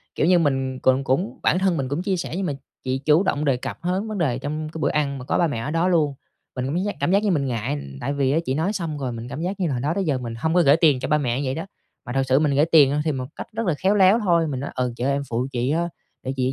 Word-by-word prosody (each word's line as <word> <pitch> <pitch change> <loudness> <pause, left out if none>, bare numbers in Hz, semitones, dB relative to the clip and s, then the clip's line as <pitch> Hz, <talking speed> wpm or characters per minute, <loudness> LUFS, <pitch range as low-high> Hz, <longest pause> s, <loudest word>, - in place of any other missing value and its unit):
kiểu - - +1
như, 180 -1 +5
mình 135 -4 0
cũng 130 +1 +2
cũng 135 +10 -1
bản 180 - +3
thân 190 -3 +1
mình 130 -3 -2
cũng 145 +5 -1
chia 190 0 0
sẻ 170 - -4
nhưng 195 - -1
mà 150 - -1 0.3
chị 130 0 -1
chủ 155 +4 +5
động 150 -6 0
đề 135 -3 +2
cập - - -6
hớn 185 +5 -1
vấn 215 -1 -4
đề 135 -9 0
trong 155 +3 -4
cái 160 - -6
bữa - - +1
ăn 140 -2 0
mà 130 - -8
có - - 0
ba 170 - +3
mẹ 145 - -3
ở 135 +6 -3
đó 165 +2 +1
luôn, 160 -6 +2 0.4
mình 125 -1 -2
cũng 140 +4 -2
cảm 180 - 0
giác 205 - -2
cảm - - +1
giác 200 +2 +3
như 210 - +2
mình 145 -6 +1
ngại, 120 +2 -2
ừm, 70 - -7
tại 140 - -2
vì 140 -2 +1
á 155 - +2
chị 130 - 0
nói 165 +8 0
xong 165 -7 -3
rồi 130 -3 -2
mình 115 0 -6
cảm 135 - -6
giác 190 +4 -3
như 180 - +1
là 145 - -1
hồi 120 - -2
đó 145 +4 0
tới 195 - 0
giờ 145 -5 +1
mình 120 -2 -5
hông 160 +8 -1
có 180 - +5
gởi 145 -1 +5
tiền 155 -6 +4
cho - - -3
ba 150 - +3
mẹ 125 -4 -1
như 140 - -2
vậy 130 - -1
đó. 165 - -4 0.4
Mà 125 - -5
thật 135 0 +2
sự 130 +1 +4
mình 150 -2 +1
gởi 145 +2 +4
tiền, 155 -5 +5
ơ, 145 - 0
thì 155 - +2
một 130 -3 -3
cách - - -7
rất 225 +1 -2
là 175 - +3
khéo 195 +5 +2
léo 195 +2 +5
thôi, 170 -6 +2
mình 135 -4 -3
nói: 140 - -4
“Ừ, 125 -2 -1
chị - - -3
ơi 135 - +2
em 140 0 0
phụ 120 +2 -1
chị 125 0 -1
á, 170 +2 0 0.3
để 130 - -3
chị 130 0 0
145 Hz, 345 wpm, -23 LUFS, 130-170 Hz, 0.4 s, như